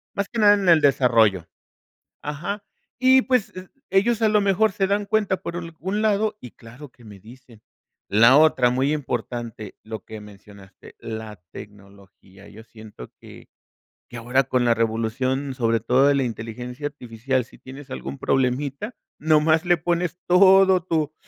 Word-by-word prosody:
más 200 0 -2
que 235 - -5
nada 205 -1 +6
en 200 -2 -3
el 165 -2 +5
desarrollo, 115 - +2 0.7
ajá. 170 +8 -5 0.4
Y 260 +1 +5
pues, 250 -8 -1
eh, 185 0 -10 0.2
ellos 220 +4 +1
a 220 - +3
lo 210 0 +2
mejor 200 +2 +2
se 195 - 0
dan 200 +1 -1
cuenta 210 -3 0
por 170 - -6
algún 175 +4 -5
lado 210 0 0
y 125 - -11
claro 120 +5 -14
que 125 - -22
me 105 -2 -13
dicen. 115 +1 -17 0.5
La 115 +6 +5
otra, 150 -5 +4
muy 130 +4 0
importante, 120 -6 -5
lo 110 -2 -8
que 110 - -9
mencionaste, 100 -1 -16
la 110 -3 -8
tecnología, 100 0 -15
yo 105 +2 -13
siento 110 - -13
que - - -15 0.6
que 120 - -9
ahora 125 +3 0
con 125 0 -1
la 120 -1 +3
revolución, 120 +5 -2
sobre 115 -2 0
todo 130 +4 +2
de 145 - +4
la 140 - +1
inteligencia 125 +3 -7
artificial, 125 -2 -4
si - - -19
tienes 135 +1 -12
algún 70 +2 -7
problemita, 140 - -2 0.2
nomás 155 +2 +2
le 175 -1 +3
pones 175 +1 -2
todo 190 0 +5
tu 155 -4 -2
130 Hz, 160 wpm, -22 LUFS, 115-180 Hz, 0.7 s, nada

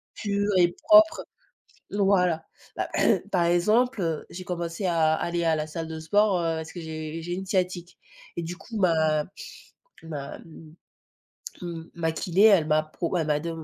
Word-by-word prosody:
purs 205 0 -1
et 175 -1 +3
propres, 320 0 +6 0.7
voilà. 185 -5 +2 0.3
Bah - - -2 0.4
par 180 -3 +2
exemple, 215 +8 +2
heu, 165 -3 -2
j'ai 185 +1 -8
commencé 170 +1 -3
à 160 -3 +2
à - - -2
aller 170 0 -1
à 165 -1 +2
la 155 0 -2
salle 160 +1 -6
de 160 0 -6
sport, 205 +3 +2
heu, 165 -1 -1
parce 160 0 -6
que 175 - -7
j'ai 160 0 -6
j'ai 175 +2 -5
une 190 +1 -5
sciatique, 180 -2 -2 0.4
et 170 - -2
du 170 +2 -5
coup, 220 +4 -8
ma 160 -5 +2 0.8
ma 145 -4 -6
m 160 -1 -14 0.9
m 170 -2 -7
ma 165 -1 -1
kiné, 180 +4 +1
elle 195 -8 +5
m'a 155 0 +3
pro 170 +3 -3
elle 160 -2 -1
m'a 150 -1 +1
de 170 +2 -5
170 Hz, 175 wpm, -26 LUFS, 160-190 Hz, 0.9 s, propres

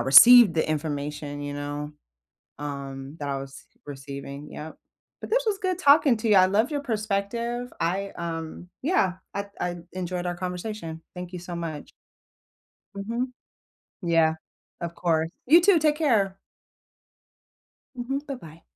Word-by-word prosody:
received 205 - +9
the 160 - +1
information, 145 -1 -3
you 145 0 -4
know, 145 +1 -4 0.7
um, 140 0 -6
that 145 - -3
I 140 - -1
was 135 0 -10 0.2
receiving. 140 +1 -8
Yep. 155 +1 -8 0.4
But - - -7
this - - +2
was 415 -3 +1
good 370 -3 -1
talking 285 -5 +6
to 220 +1 -1
you. 210 - +6
I 185 -1 +8
love 215 +9 +2
your 290 - 0
perspective. 235 +1 -2
I, 195 +4 0
um, 165 +1 -5
yeah, 255 - +2 0.2
I 200 0 -3
I 175 0 -2 0.2
enjoyed 180 -1 -3
our 175 0 -1
conversation. 180 -2 -5
Thank 180 0 -7
you 180 - -4
so 175 0 -7
much. 165 -3 -5 1.1
Mhm. 235 +5 -3 0.7
Yeah. 165 -2 +3 0.5
Of 170 0 -4
course. 160 -2 +1 0.2
You 330 +6 +7
too. 370 -2 +5
Take 300 -1 +3
care. 215 -11 +2 1.6
Mhm. 260 +3 -2
Bye-bye. 165 - -8
180 Hz, 140 wpm, -26 LUFS, 150-235 Hz, 1.6 s, received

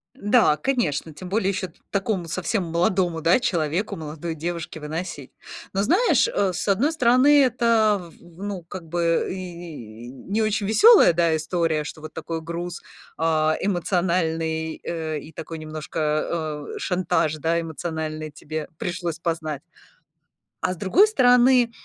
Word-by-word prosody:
Да, 210 -7 +3
конечно, 165 - -1
тем 180 +4 -9
более 195 -1 +1
еще 190 -1 -2
т 170 - -24
такому 195 -3 -1
совсем 185 +4 -1
молодому, 170 0 0
да, 170 +9 +4
человеку, 170 -3 -1
молодой 160 +1 -5
девушке 165 0 -5
выносить. 150 -2 -6 0.4
Но 195 +1 +1
знаешь, 410 - +3
э, 200 - 0
с 175 - -4
одной 230 +11 +2
стороны, 275 +1 +5
это 230 -5 +3
в 170 - -11 0.3
в - - -7
ну, 200 -4 -4
как 170 -1 -9
бы 170 -1 +1
и 170 - -8
не 195 - -3
очень 215 -1 0
веселая, 415 - +7
да, 165 -1 +2
история, 160 -1 0
что 155 +1 -8
вот 155 - -9
такой 165 -1 -5
груз, 170 +1 -5 0.4
а, 155 -1 +2
эмоциональный, 165 -4 0
э, 160 -2 -3
и 155 +3 -12
такой 165 0 -7
немножко, 155 0 -3
э, - - -6
шантаж, 180 -4 0
да, 165 +2 0
эмоциональный 160 -1 -5
тебе 155 +1 -6
пришлось 175 -2 -3
познать. 160 -4 -3 1.0
А 185 - 0
с - - -11
другой 290 - +4
стороны, 250 - +5
170 Hz, 145 wpm, -24 LUFS, 160-200 Hz, 1.0 s, веселая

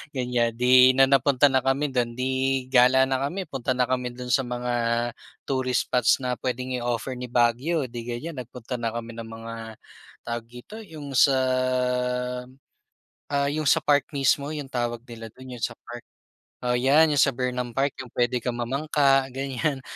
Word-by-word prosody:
ganyan, 125 -2 0
di 125 +1 +6
na 135 - +6
napunta 140 0 +4
na 130 - +3
kami 135 +2 0
dun, 120 -2 -1
di 130 +1 0
gala 130 +1 +6
na 130 0 0
kami, 190 +5 -4
punta 130 -4 -3
na 125 - +2
kami 125 0 -1
dun 125 0 -6
sa 135 - +4
mga 125 0 -3 0.7
tourist 130 -2 0
spots 125 +1 +3
na 125 -1 -2
puwedeng 125 0 -3
i-offer 120 +1 -2
ni 125 0 -6
Baguio 125 +4 +1
di 120 -1 -7
gan'yan, 130 +5 -5
nagpunta 125 0 -7
na 115 - -2
kami 115 0 -5
ng 115 - -7
mga 115 0 -8 0.7
tawag 115 -1 -5
dito? 125 - -11
Yung 155 -9 -9
sa, 135 +1 +5 2.0
ah, 140 0 +1
yung 150 +1 -2
sa - - +5
park 145 -1 +3
mismo 140 +1 +1
yung 145 -3 -5
tawag 120 -2 -2
nila 115 -2 -9
dun, 130 0 -10
yung 120 - -9
sa - - 0
park? 120 0 -10 0.6
Oo, 125 0 +1
’yan 145 +5 +4
’yung 145 - +1
sa 135 - +3
Burnham 125 -1 -3
Park, 135 +1 +1
’yung 130 - -7
puwede 120 +1 +1
kang 120 0 -3
mamangka, 135 +2 +2
gan'yan, 135 +1 -2
130 Hz, 175 wpm, -25 LUFS, 120-135 Hz, 2.0 s, di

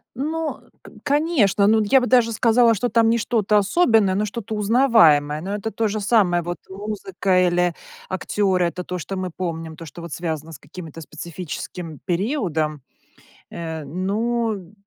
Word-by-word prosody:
Ну, 315 +4 -3
э, - - -25
к - - -13
конечно, 280 - +2
ну, 220 +1 +4
я 260 +6 +4
бы 250 - -1
даже 240 -2 +4
сказала, 230 +1 +4
что 240 +3 -1
там 230 -1 +3
не 230 - +3
что-то 215 -2 +1
особенное, 210 - +3
но 210 +2 +1
что-то 220 +1 -5
узнаваемое. 200 - +4
Но 195 +4 -3
это 220 +2 -4
то 225 - 0
же 215 +1 -2
самое, 200 -5 +3
вот 175 +1 -4
музыка 190 -2 0
или 175 0 +1 0.4
актёры, 190 -1 0
это 175 +1 -3
то, 180 +1 -5
что 185 +3 -5
мы 185 -1 -3
помним, 165 -3 -4
то, 165 0 -10
что 160 +3 -10
вот 170 -2 -8
связано 160 -2 -4
с 160 - -9
каким-то 165 +1 -10
специфическим 165 0 -7
периодом. 170 - -1 0.7
Э, 160 -2 -5
ну, 205 +4 -2
195 Hz, 165 wpm, -22 LUFS, 170-225 Hz, 0.7 s, ну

